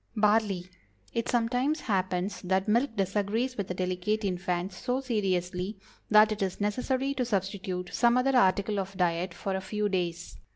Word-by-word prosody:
BARLEY. 210 -4 +2 0.5
It 230 0 -1
sometimes 245 +6 +1
happens 185 -2 -1
that 190 +1 0
milk 235 +3 +2
disagrees 205 +6 0
with 200 -4 -4
a 180 - -2
delicate 185 +4 -1
infant 180 0 -2
so 250 +7 -2
seriously 190 -5 -1 0.3
that 215 0 +7
it 210 - -3
is 190 -2 -1
necessary 255 +6 0
to 260 -2 -1
substitute 190 -4 -2
some 240 +1 +4
other 265 +1 +2
article 200 -2 +3
of 195 0 -5
diet 175 0 +1
for 195 +2 -3
a 190 - -2
few 210 +2 -1
days. 175 -2 -3
200 Hz, 160 wpm, -29 LUFS, 185-230 Hz, 0.5 s, that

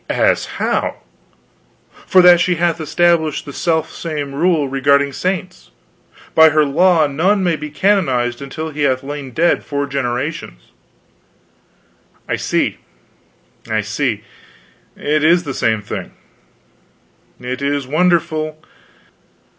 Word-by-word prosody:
"As - - +1
how?" - - -1 1.1
"For 185 -2 +5
that 175 -1 +7
she 180 +1 +1
hath 170 0 0
established 165 -1 +1
the 140 - -8
self 160 +1 -1
same 150 -4 -5
rule 160 -1 +1
regarding 140 +1 +2
saints. 185 +2 -4 0.6
By 160 0 +7
her 155 0 +3
law 165 +3 +3
none 180 +8 +1
may 175 -2 +1
be 150 0 -7
canonized 140 -9 0
until 155 +4 -6
he 150 0 -6
hath 130 -2 +1
lain 145 -1 -6
dead 165 +7 +1
four 140 -1 -2
generations." 125 - -4 1.6
"I - - 0
see, - - -1 0.9
I 110 -1 0
see 105 +1 -2 0.7
it 150 +1 0
is 170 +3 +4
the 140 -4 -5
same 110 -3 0
thing. - - -6 1.3
It 125 +2 -5
is 140 -1 -1
wonderful. 155 0 0
150 Hz, 120 wpm, -17 LUFS, 135-170 Hz, 1.6 s, that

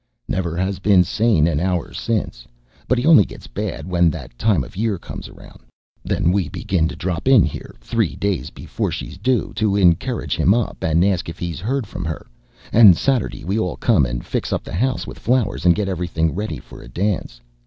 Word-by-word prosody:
"Never 85 -3 -2
has 95 +1 -1
been 100 -3 +5
sane 105 -3 +2
an 80 -3 +1
hour 90 0 -1
since. 110 - -3 0.4
But 125 - +2
he 120 - -1
only 160 -10 +7
gets - - -11
bad - - -5
when 85 -2 +3
that 70 -6 -7
time 95 - +2
of 60 - -12
year 105 0 0
comes - - -9
round. - - -15 0.4
Then 85 - +1
we 95 -1 0
begin 85 -4 0
to - - -6
drop 90 +4 -3
in 130 -8 +7
here, 80 - -5
three 110 - -1
days 100 -3 -2
before - - -4
she's 85 +3 -6
due, 125 +4 0
to 105 -3 +1
encourage 90 -5 +2
him 100 - +3
up, 120 -2 -2
and 80 +3 +3
ask 95 -4 0
if 80 - -8
he's 85 -1 -4
heard 125 +6 -2
from - - -6
her, 80 -1 -5 0.5
and 105 -7 +8
Saturday 130 -5 -1
we 100 +5 0
all 90 -5 -1
come 65 - +3
and - - -5
fix - - -3
up - - -1
the - - -9
house 125 +8 0
with - - -9
flowers, 110 -7 0
and 85 - +6
get 105 -2 -1
everything 85 -3 -1
ready 100 -5 -3
for - - -13
a - - -12
dance. 90 -7 -2
95 Hz, 205 wpm, -20 LUFS, 85-110 Hz, 0.5 s, and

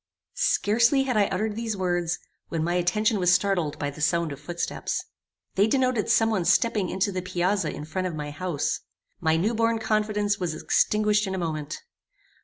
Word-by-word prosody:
Scarcely 235 +6 +3
had 260 -3 -1
I 205 -2 +4
uttered 210 +3 -2
these 225 -2 -3
words, 175 -2 0 0.3
when 165 -1 -1
my 175 +2 0
attention 205 +5 +1
was 180 -1 +3
startled 185 -5 +1
by 145 0 -2
the 145 - -10
sound 170 +1 +1
of 140 - -7
footsteps. 170 +4 -3 0.5
They 200 +2 +3
denoted 255 -2 +1
some 225 -1 +4
one 190 -5 +1
stepping 195 +1 +2
into 190 +2 0
the 185 -1 -3
piazza 180 0 0
in 150 - -7
front 185 +4 -2
of 170 - -5
my 150 -1 -5
house. 155 0 -2 0.4
My 160 0 +2
new 205 +8 +1
born 230 0 +2
confidence 210 -2 0
was 170 -4 -3
extinguished 210 -1 +2
in 190 - -2
a - - -3
moment. 155 -4 -4
190 Hz, 185 wpm, -26 LUFS, 170-215 Hz, 0.5 s, I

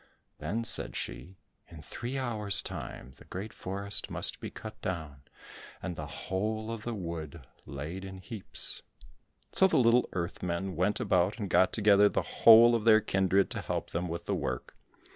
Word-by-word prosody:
Then 95 +10 -2
said - - +4
she, 95 +1 -6 0.3
"In 80 -3 -12
three 120 - -5
hours' 110 -6 +3
time 65 - -7
the - - -16
great 100 +4 -7
forest 100 +2 -2
must - - -2
be - - -6
cut 110 0 -10
down, 80 -6 -5 0.6
and 90 -2 -5
the - - -6
whole 110 +3 -3
of 115 -2 -5
the 120 +1 -4
wood 85 -5 -6 0.2
laid 75 +7 -6
in 95 0 -8
heaps." 105 +1 -3 0.7
So 190 - +5
the - - +1
little 120 0 +4
earth 85 -1 -4
men 90 +1 -3
went 95 +5 0
about 100 -3 +1
and 100 -5 -5
got 95 - +4
together 105 -1 +5
the - - -1
whole 115 +1 +7
of 115 -2 0
their 110 -1 +6
kindred 95 -2 +1
to - - -3
help - - -4
them 90 +2 -2
with 85 0 -5
the - - -1
work. 65 -2 -4
95 Hz, 175 wpm, -30 LUFS, 85-110 Hz, 0.7 s, whole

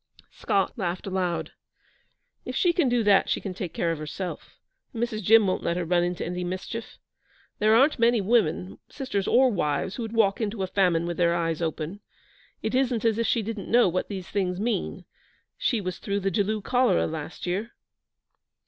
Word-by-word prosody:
Scott - - 0
laughed 180 -2 -2
aloud. 185 -3 -2 0.9
'If - - -6
she 350 -2 +3
can 335 -7 +2
do 240 -1 +2
that 200 -2 +4
she - - +1
can 195 - -5
take 180 -2 -5
care 170 - -1
of 165 - -3
herself, 165 +4 -6 0.4
and 230 - -1
Mrs. 220 -2 -2
Jim 220 +2 +6
won't 185 - 0
let 170 - -1
her 180 - -1
run 175 +1 +2
into 175 0 -2
any 180 0 -3
mischief. 185 +5 -5 0.6
There 215 +1 +4
aren't 270 +3 +4
many 235 0 +4
women, 165 - +1
sisters 255 -9 -3
or 260 0 +5
wives, 180 0 -1
who - - -4
would 225 -1 -5
walk 215 -2 +2
into 205 -2 -2
a - - +1
famine 180 -3 +2
with 175 0 -3
their 170 -1 +3
eyes 165 -1 -1
open. 160 +3 -3 0.6
It - - -2
isn't 250 -3 +1
as 225 -1 +2
if 230 - +1
she 230 - +1
didn't 210 -3 -5
know 240 -1 +5
what 185 +1 -1
these 190 -3 -5
things 185 -2 -1
mean. 230 +3 -2 0.5
She 235 - 0
was 185 -3 -4
through 200 -1 -2
the 195 0 0
Jaloo 210 0 0
cholera 250 +2 +2
last 160 0 -6
year.' 200 +6 -3
195 Hz, 195 wpm, -26 LUFS, 175-230 Hz, 0.9 s, Jim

